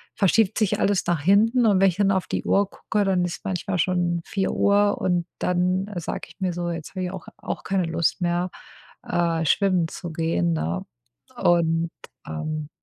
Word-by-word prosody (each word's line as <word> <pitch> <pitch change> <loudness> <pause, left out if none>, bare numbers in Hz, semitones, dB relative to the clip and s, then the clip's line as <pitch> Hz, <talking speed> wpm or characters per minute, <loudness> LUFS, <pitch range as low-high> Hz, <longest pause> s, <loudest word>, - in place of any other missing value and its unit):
verschiebt 210 +1 +3
sich 215 -4 +1
alles 200 -2 +2
nach 170 -3 +1
hinten 220 - +4
und 205 -4 +4
wenn 195 - +6
ich 175 - -4
dann 200 -1 +3
auf 190 -2 0
die - - -3
Uhr 200 0 +2
gucke, 210 0 -1
dann 185 -2 +2
ist 175 - -6
manchmal 185 0 -2
schon 175 -1 +1
4:00 200 +2 +2
und 175 -2 +1
dann 180 +2 0
sage 175 -2 -4
ich - - -16
mir 185 -2 -1
so: 175 0 -3
„Jetzt 165 -2 -5
habe 185 -1 -3
ich 180 - -4
auch 190 -2 -8
auch - - -5
keine 190 -2 0
Lust 165 +2 0
mehr, 175 +1 0 0.6
äh, 170 -1 +1
schwimmen 185 +1 +2
zu 175 +1 -7
gehen”, 160 - 0
ne? 80 +3 -2 0.5
Und, 170 -5 +2 0.4
ähm 150 - -4
180 Hz, 180 wpm, -24 LUFS, 165-195 Hz, 0.6 s, wenn